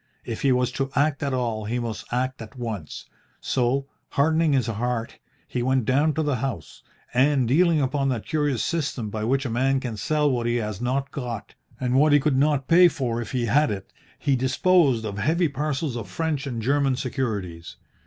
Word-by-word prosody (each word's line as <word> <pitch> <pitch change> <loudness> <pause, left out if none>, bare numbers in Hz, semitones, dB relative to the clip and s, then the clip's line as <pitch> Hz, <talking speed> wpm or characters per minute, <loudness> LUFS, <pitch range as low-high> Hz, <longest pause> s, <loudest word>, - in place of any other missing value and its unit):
If 115 - -5
he 135 - +3
was 125 0 +2
to 135 +1 -2
act 145 +1 +2
at 140 - -1
all 115 -4 -1
he 115 +3 -2
must 115 -3 -5
act 130 +1 -1
at 115 +3 -10
once, 110 -10 -5 0.3
so, 130 +2 0 0.2
hardening 160 +2 +2
his 130 -4 +2
heart, 115 +1 -3 0.3
he 125 - -2
went 130 -1 +1
down 145 +6 +2
to 160 - 0
the 145 -4 0
house, 115 - -5 0.3
and, 130 0 +3
dealing 165 +5 +4
upon 135 0 0
that 120 -5 -2
curious 145 -6 0
system 140 -9 -2
by 110 0 -3
which 135 +4 +1
a - - -1
man 135 +3 +2
can 120 -4 -5
sell 150 +7 +1
what 120 -2 -1
he 120 - +1
has 105 -3 -3
not 135 +3 -1
got, 120 -5 -5 0.3
and 125 -1 -1
what 145 +3 +5
he 145 - +7
could 145 -1 +1
not 140 0 +2
pay 180 +2 +7
for 120 -8 -2
if 115 - -7
he 125 -3 0
had 145 +5 +3
it, 100 -3 -6 0.2
he 140 -2 +1
disposed 130 - +3
of 105 -1 -4
heavy 165 +7 +2
parcels 145 -1 -2
of 110 -5 -5
French 150 - -2
and 115 -4 -4
German 140 +1 +2
securities. 105 -10 -4
130 Hz, 200 wpm, -24 LUFS, 120-145 Hz, 0.3 s, he